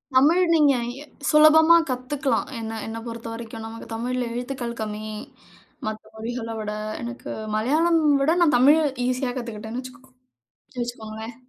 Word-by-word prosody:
தமிழ் 315 +8 +5
நீங்க 295 -4 +5 0.3
எ - - -10 0.2
சுலபமா 315 +2 +7
கத்தக்கலாம். 265 +3 -1
என்ன, 225 0 -5
என்னப் 225 +1 -6
பொறுத்தவரைக்கும் 230 -1 -7
நமக்கு 225 0 -9
தமிழ்ல 250 +2 -2
எழுத்துக்கள் 245 -1 -4
கம்மி. 215 0 -4 0.9
மத்த 215 0 -4
மொழிகள 230 +1 -5
விட. 210 -1 -3 0.3
எனக்கு 240 +1 -7 0.3
மலையாளம் 315 +9 +3 0.2
விட 320 +5 +3
நான் 300 -7 +5
தமிழ் 290 +6 +6 0.3
ஈசியா 255 0 0
கத்துக்கிட்டேன்னு 230 0 -5
வச்சிக்கோங்க 255 +1 -13 0.7
வச்சிக்கோங்களேன். 225 -1 -6
245 Hz, 125 wpm, -24 LUFS, 225-275 Hz, 0.9 s, சுலபமா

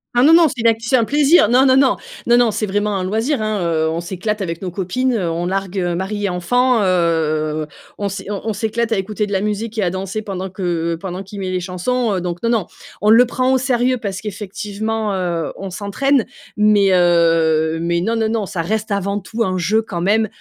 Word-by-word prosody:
Ah 245 - +4
non, 310 +4 +6
non! 335 -1 +7
C'est 250 -4 -5
une 230 - +3
acti 225 0 +1
c'est - - +4
un 235 - +3
plaisir, 290 -4 +4
non, 255 +2 +5
non, 260 0 +5
non, 270 -1 +4 0.3
non, 240 - +4
non. 240 -2 +4
C'est 215 - -2
vraiment 205 +1 -1
un 185 - -2
loisir, 220 +6 -1
hein. 215 -1 -1
Heu, 160 -2 +1
on 165 +1 -2
s'éclate 195 +4 -3
avec 165 -3 -3
nos 185 - -3
copines, 200 +8 -1
heu, 190 -7 -1
on 165 +1 -2
largue, 195 +1 -3
heu, 175 -2 0
maris 205 +3 -3
et - - 0
enfants, 240 +7 +1
heu, 155 -4 0 0.3
on 200 - -1
s'é 190 0 -6
on 200 - -4
on - - 0
s'éclate 225 +2 -2
à 225 - +2
écouter 205 +2 -2
de 200 - -8
la 190 - 0
musique 210 +2 -3
et 210 - +1
à 175 - 0
danser 190 +3 -4
pendant 190 -2 -5
que 170 -3 -2
pendant 180 +2 -6
qu'il 200 +1 -9
met 190 -1 -3
les 185 - -1
chansons, 200 +6 -1
heu, 185 - -2
donc 175 -1 -4
non 230 - 0
non. 225 -6 +1 0.4
On 210 +1 +4
le 230 +2 +7
prend 255 +2 +1
au 260 - +3
sérieux 255 -1 +1
parce 195 -3 -4
qu'effectivement, 210 +1 -4
heu, 175 -3 -2
on 195 - -6
s'entraîne 220 +7 0 0.3
mais 210 -2 +4
heu, 165 -3 +3
mais 170 +1 0
non, 225 +6 0
non, 220 -1 0
non 220 -2 -1
ça 170 -2 -3
reste 215 +5 -2
avant 200 0 -1
tout 225 +4 -3
un 185 -2 -1
jeu 215 +6 +1
quand 175 -5 -5
même, 215 +4 +2
200 Hz, 240 wpm, -18 LUFS, 180-225 Hz, 0.4 s, non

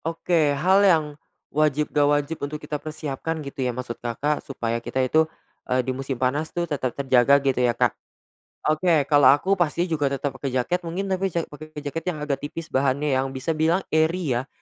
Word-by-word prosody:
Oke, 165 -3 +1
hal 185 +6 +4
yang 170 -6 +5 0.5
wajib, 150 0 +1
enggak 145 -1 +3
wajib 145 +2 0
untuk 145 +2 -3
kita 150 -1 -5
persiapkan 155 +1 -4
gitu 140 -1 -6
ya, 125 - +1
maksud 120 -1 -5
Kakak, 140 +6 -1
supaya 115 -3 -3
kita 120 +2 -6
itu, 160 +4 +2 0.4
eee, 125 0 +1
di 130 - -1
musim 135 0 -4
panas 140 +5 0
tuh 175 0 -2
tetap 140 -6 -3
terjaga 135 0 +4
gitu 130 -2 +2
ya, 120 -2 +2
Kak. - - +2 0.8
Oke, 155 -1 +3
kalau 145 -3 +6
aku 185 +8 +4
pasti 170 0 +1
juga 145 -3 +1
tetap 140 +1 -2
pake 140 - -3
jaket 130 +8 +1
mungkin, 190 +4 -3
tapi 190 +1 +1
ja 170 - +1
pake 155 +1 -12
jaket 150 +3 -4
yang - - -7
agak 140 -2 -1
tipis 160 +3 -7
bahannya, 140 +2 +1
yang 130 0 +1
bisa 130 +5 -2
bilang 165 +4 +1
airy 160 0 +1
ya, 130 - -7
145 Hz, 195 wpm, -24 LUFS, 135-160 Hz, 0.8 s, kalau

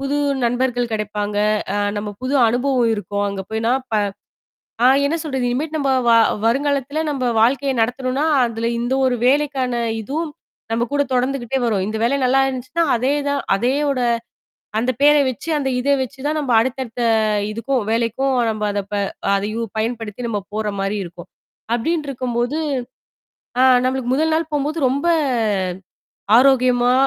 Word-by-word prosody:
புது 275 +1 -1 0.3
நண்பர்கள் 245 0 0
கிடைப்பாங்க, 210 -1 -3 0.4
அ - - 0 0.2
நம்ம 205 0 -4
புது 260 +2 -1
அனுபவம் 245 0 +1
இருக்கும். 205 0 -3
அங்க 200 -1 -5
போனா 225 +2 +1 0.2
ப - - +1 0.9
ஆ - - +8 0.2
என்ன 295 +4 +1
சொல்றது. 265 -5 -2
இனிமேலு 300 +6 -2
நம்ப 275 -3 0 0.2
வ - - +6 0.3
வருங்காலத்தில 280 +4 0
நம்ம 265 -3 -2 0.2
வாழ்க்கைய 270 +4 +2
நடத்தணும்னா, 255 +4 0 0.2
அதுல 230 0 -3
இந்த 240 +2 -1
ஒரு 255 -1 +2
வேலைக்கான 270 -2 +1 0.3
இதுவும் 300 +8 -3 0.4
நம்ம 230 +1 +1
கூட 285 - +2
தொடர்ந்துக்கிட்டே 255 0 0
வரும். 210 -5 0
இந்த 215 +1 -3
வேலை 240 +4 +2
நல்லா 265 +2 +4
இருந்துச்சுன்னா, 260 +5 -2
அதே 255 +4 +1 0.2
தான் 285 -1 0
அதேயோட 270 +5 0 0.8
அந்த 245 +3 +1
பேர 295 +1 +6
வச்சு, 260 +6 -6
அந்த 275 -2 -1
இத 265 +3 -1
வச்சு 265 +1 -6
தான் 310 - 0
நம்ம 280 -4 -2
அடுத்தடுத்த 245 0 -2 0.5
இதுக்கும் 235 +2 -1
வேலைக்கும் 235 +4 0 0.2
நம்ம 215 -1 -3
அத 205 0 -1
ப - - -2 0.4
அதையும் 215 +2 -3
பயன்படுத்தி 225 +1 -3
நம்ம 210 -3 -1
போற 215 0 -2
மாரி 195 +2 -1
இருக்கும். 175 0 -11 0.5
அப்டின்னு 305 +5 -1
இருக்கும்போது 250 +2 -2 1.0
ஆ - - +5 0.2
நம்மளுக்கு 255 -1 -1
முதல் 315 +3 +1
நாள் 320 0 -1
போம்போது 295 +3 -1
ரொம்ப 280 +5 -1 1.3
ஆரோக்கியமா, 250 -1 +4
255 Hz, 145 wpm, -20 LUFS, 230-275 Hz, 1.3 s, ஆ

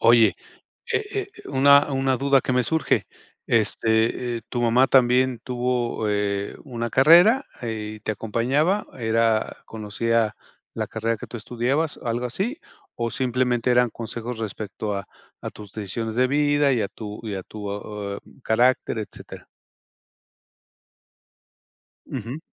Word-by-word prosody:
Oye, 115 -1 +5 0.6
eh 440 -2 +1 0.3
eh, - - -12
una 140 +2 +5
una 135 -1 +1
duda 140 -1 +4
que 130 - -2
me 125 0 +3
surge, 160 +2 +1 0.4
este, 115 +2 +1
eh, 115 - -7
¿tu 120 - -2
mamá 120 +2 +4
también 125 -1 +3
tuvo 125 -3 -1
eh, 100 -1 -1
una 120 -4 -4
carrera 175 - +6 0.2
eh, 110 -2 -4
y - - -15
te 110 - -2
acompañaba? 130 - 0
¿Era 115 -1 +1
conocía 110 0 -1 0.4
la - - -2
carrera 115 +1 -2
que - - -9
tú - - -8
estudiabas, 125 +7 -1
algo 120 0 -1
así? 205 - -2 0.4
¿O 115 -1 -2
simplemente 125 -1 0
eran 125 0 +4
consejos 120 +1 -6
respecto 105 -1 -4
a 100 0 -4 0.3
a - - -5
tus 105 -2 -12
decisiones 110 +2 -4
de 130 +1 +4
vida 145 0 +3
y 120 -4 +1
a 100 - -2
tu 105 -1 -8
y 105 - -3
a 95 - -4
tu 105 +2 -9
oh, 100 0 -5
eh, - - -7 0.2
carácter, 120 0 +2
etcétera? 105 - -8 2.6
Ujú. 125 +3 -5
120 Hz, 140 wpm, -24 LUFS, 110-130 Hz, 2.6 s, carrera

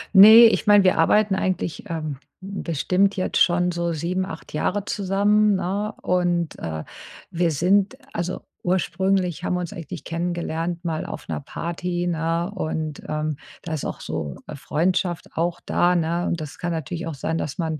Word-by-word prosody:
Ne, 220 +4 +11
ich 225 - +3
meine, 205 -1 +7
wir 185 - +3
arbeiten 205 +4 +4
eigentlich, 185 0 -2
ähm, 155 -4 -3 0.2
bestimmt 190 0 0
jetzt 185 - 0
schon 180 0 +3
so 170 -1 -1
7, 180 +4 -1
8 160 -4 -9
Jahre 200 +6 -1
zusammen, 205 +1 +2
ne? 200 +3 -2
Und, 175 -2 0
äh, 80 -1 -4 0.5
wir 170 0 +1
sind 190 +7 +2 0.2
also, 175 +1 -3 0.2
ursprünglich 185 -1 0
haben 180 - 0
wir - - -1
uns 175 +1 -5
eigentlich 165 -7 -7
kennengelernt, 170 0 -3
mal 160 -2 -2
auf - - -7
'ner - - -3
Party, 175 +4 -3
ne? 165 +1 -1
Und, 155 -4 -3
ähm, 155 -1 -2 0.3
da 165 - -4
ist 155 - -3
auch - - -5
so 70 -2 -4 0.2
Freundschaft 175 +4 -1
auch 170 +1 -1
da, 180 +1 +2
ne? 170 +1 0
Und 170 - -1
das 145 -1 -8
kann 175 0 -2
natürlich 165 +2 -4
auch 160 - -4
sein, 160 +4 -2
dass 140 - -4
man, 160 -3 -2
175 Hz, 170 wpm, -23 LUFS, 165-190 Hz, 0.5 s, Ne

